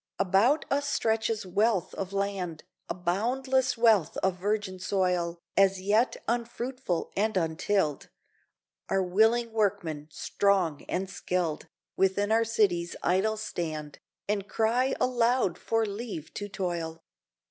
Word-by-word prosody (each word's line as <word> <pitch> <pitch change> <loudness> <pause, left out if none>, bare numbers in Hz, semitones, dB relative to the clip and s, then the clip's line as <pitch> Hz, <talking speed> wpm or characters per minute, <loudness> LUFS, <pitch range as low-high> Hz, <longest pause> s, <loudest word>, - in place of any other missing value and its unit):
About 200 - +3
us 285 +1 +1
stretches 220 -4 0
wealth 200 +1 +1
of 190 -1 -4
land, 195 -5 -2 0.3
A - - -2
boundless 245 +8 0
wealth 220 -8 +4
of 190 -1 +1
virgin 205 -1 -1
soil 180 -3 0 0.2
As 195 -1 +4
yet 210 +6 +2
unfruitful 240 -3 -2
and 215 +1 +1
untilled! 165 -1 0 0.8
Our 195 0 +2
willing 225 +6 +3
workmen, 165 -8 -1
strong 175 0 +1
and 190 +2 -1
skilled 180 -4 -2 0.3
Within 195 +2 +2
our 225 +1 +4
cities 185 -6 +1
idle 195 +5 +2
stand, 155 -7 -4 0.3
And 205 -1 -1
cry 245 +4 +1
aloud 240 -6 +2
for 225 -1 +1
leave 205 -6 -6
to 205 0 -5
toil. 170 -4 -4
200 Hz, 120 wpm, -28 LUFS, 180-225 Hz, 0.8 s, wealth